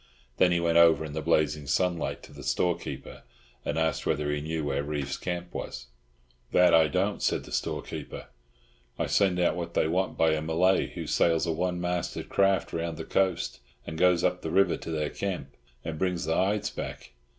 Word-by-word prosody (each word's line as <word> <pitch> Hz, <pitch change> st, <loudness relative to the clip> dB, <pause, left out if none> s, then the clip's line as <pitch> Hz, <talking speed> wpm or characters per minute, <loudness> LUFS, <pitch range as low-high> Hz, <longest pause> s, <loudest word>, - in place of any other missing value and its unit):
Then 90 Hz, -, +5 dB
he 85 Hz, -, +2 dB
went 85 Hz, 0 st, +3 dB
over 80 Hz, -1 st, +5 dB
in 75 Hz, -, -7 dB
the 80 Hz, -, -3 dB
blazing 75 Hz, -2 st, +1 dB
sunlight 85 Hz, +4 st, 0 dB
to -, -, -13 dB
the -, -, -10 dB
storekeeper, 90 Hz, -1 st, -2 dB, 0.4 s
and 75 Hz, -, -2 dB
asked 80 Hz, 0 st, 0 dB
whether 75 Hz, 0 st, 0 dB
he 75 Hz, 0 st, -1 dB
knew 80 Hz, +1 st, -3 dB
where 70 Hz, -1 st, -1 dB
Reeves' 70 Hz, -2 st, -3 dB
camp 90 Hz, 0 st, -5 dB
was. 60 Hz, -, -6 dB, 0.6 s
"That 90 Hz, -1 st, +5 dB
I 80 Hz, -1 st, +6 dB
don't," 70 Hz, -, 0 dB
said -, -, +1 dB
the -, -, -12 dB
storekeeper. -, -, -4 dB, 0.7 s
"I -, -, 0 dB
send 95 Hz, -3 st, +2 dB
out 90 Hz, -, +2 dB
what 85 Hz, -1 st, -5 dB
they -, -, +3 dB
want 90 Hz, +3 st, -1 dB
by 80 Hz, -1 st, +4 dB
a 80 Hz, 0 st, 0 dB
Malay 85 Hz, +4 st, +2 dB
who -, -, -7 dB
sails 85 Hz, -1 st, +2 dB
a 85 Hz, -, 0 dB
one 90 Hz, +2 st, -1 dB
masted 90 Hz, -1 st, -3 dB
craft 95 Hz, -1 st, +2 dB
round 85 Hz, -1 st, -3 dB
the 80 Hz, -, -6 dB
coast, 95 Hz, -3 st, 0 dB, 0.3 s
and 80 Hz, -, -6 dB
goes 90 Hz, +1 st, +3 dB
up 90 Hz, -, +1 dB
the 80 Hz, -, -4 dB
river 95 Hz, +4 st, +3 dB
to -, -, -8 dB
their 75 Hz, -2 st, -1 dB
camp, 90 Hz, -9 st, -4 dB, 0.3 s
and 80 Hz, -1 st, -4 dB
brings 90 Hz, -2 st, 0 dB
the 80 Hz, -, 0 dB
hides 100 Hz, +4 st, +1 dB
back. -, -, -7 dB
85 Hz, 195 wpm, -28 LUFS, 80-90 Hz, 0.7 s, I